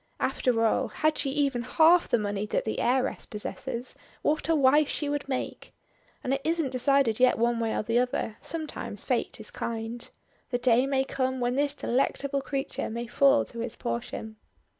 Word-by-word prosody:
After 250 Hz, -3 st, +1 dB
all 220 Hz, -, +2 dB
had 310 Hz, 0 st, +1 dB
she 275 Hz, -, +2 dB
even 275 Hz, -3 st, 0 dB
half 325 Hz, +7 st, +5 dB
the -, -, +3 dB
money 205 Hz, -1 st, -2 dB
that -, -, -1 dB
the 220 Hz, -, -2 dB
heiress 260 Hz, +1 st, 0 dB
possesses, 235 Hz, +3 st, -5 dB, 0.3 s
what 310 Hz, +2 st, 0 dB
a 325 Hz, -, +4 dB
wife 290 Hz, +1 st, +5 dB
she 295 Hz, -, -2 dB
would 290 Hz, -1 st, -3 dB
make. 260 Hz, -, -4 dB, 0.5 s
And 260 Hz, -, 0 dB
it 275 Hz, -, -1 dB
isn't 325 Hz, -4 st, 0 dB
decided 260 Hz, -3 st, +2 dB
yet 255 Hz, 0 st, +5 dB
one 235 Hz, 0 st, +1 dB
way 225 Hz, -1 st, 0 dB
or -, -, -1 dB
the 230 Hz, +3 st, +2 dB
other; 245 Hz, -3 st, -1 dB
sometimes 315 Hz, -3 st, -4 dB
Fate -, -, -1 dB
is -, -, -9 dB
kind. 230 Hz, +1 st, -4 dB, 0.4 s
The 245 Hz, -, 0 dB
day 250 Hz, +1 st, +3 dB
may 270 Hz, -1 st, +2 dB
come 260 Hz, -1 st, -2 dB
when 245 Hz, 0 st, 0 dB
this 285 Hz, +2 st, 0 dB
delectable 275 Hz, +2 st, 0 dB
creature 275 Hz, 0 st, -3 dB
may 235 Hz, +2 st, -4 dB
fall 275 Hz, +4 st, +4 dB
to 235 Hz, -, -9 dB
his 230 Hz, 0 st, -4 dB
portion. 215 Hz, -, -5 dB
255 Hz, 185 wpm, -28 LUFS, 235-280 Hz, 0.5 s, half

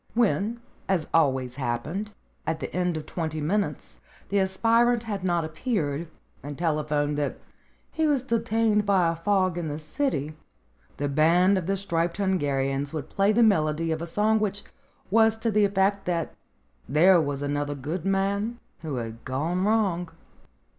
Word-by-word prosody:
When, 230 Hz, 0 st, +1 dB, 0.3 s
as 180 Hz, -5 st, +1 dB
always 130 Hz, -5 st, +2 dB
happened, 150 Hz, -, -3 dB, 0.4 s
at 160 Hz, 0 st, -1 dB
the -, -, -6 dB
end 180 Hz, -2 st, 0 dB
of 155 Hz, -, -6 dB
twenty 160 Hz, -1 st, -3 dB
minutes 195 Hz, +7 st, -2 dB, 0.3 s
the 200 Hz, -, +2 dB
aspirant 230 Hz, +5 st, +2 dB
had 205 Hz, -4 st, -4 dB
not 175 Hz, -3 st, +1 dB
appeared, 160 Hz, -, -2 dB, 0.3 s
and 145 Hz, 0 st, -7 dB
telephoned 150 Hz, -3 st, 0 dB
that 145 Hz, -, -2 dB, 0.5 s
he 320 Hz, -1 st, +1 dB
was 280 Hz, -4 st, +1 dB
detained 225 Hz, -3 st, +1 dB
by 190 Hz, -5 st, +3 dB
a -, -, -4 dB
fog 185 Hz, 0 st, +1 dB
in 165 Hz, -, -3 dB
the 150 Hz, 0 st, -3 dB
City, 155 Hz, -, -2 dB, 0.6 s
the 145 Hz, -, -1 dB
band 170 Hz, +7 st, +4 dB
of 185 Hz, -3 st, -2 dB
the 195 Hz, 0 st, +1 dB
Striped 170 Hz, -3 st, -1 dB
Hungarians 140 Hz, -7 st, 0 dB
would 155 Hz, -4 st, -5 dB
play 200 Hz, +1 st, +3 dB
the 235 Hz, +2 st, +4 dB
melody 165 Hz, -5 st, +2 dB
of 160 Hz, 0 st, -2 dB
a 170 Hz, -, -4 dB
song 215 Hz, +5 st, +2 dB
which 205 Hz, -1 st, -2 dB, 0.5 s
was 220 Hz, +1 st, +5 dB
to 225 Hz, 0 st, -1 dB
the 210 Hz, 0 st, +4 dB
effect 200 Hz, 0 st, +1 dB
that 170 Hz, -2 st, -1 dB, 0.6 s
there 170 Hz, +5 st, +6 dB
was 145 Hz, -2 st, -3 dB
another 145 Hz, 0 st, -2 dB
good 155 Hz, +6 st, -4 dB
man 200 Hz, +4 st, 0 dB, 0.2 s
who 155 Hz, -4 st, -4 dB
had 115 Hz, -1 st, -6 dB
gone 165 Hz, +8 st, -1 dB
wrong. 195 Hz, -6 st, +1 dB
175 Hz, 160 wpm, -26 LUFS, 150-205 Hz, 0.6 s, there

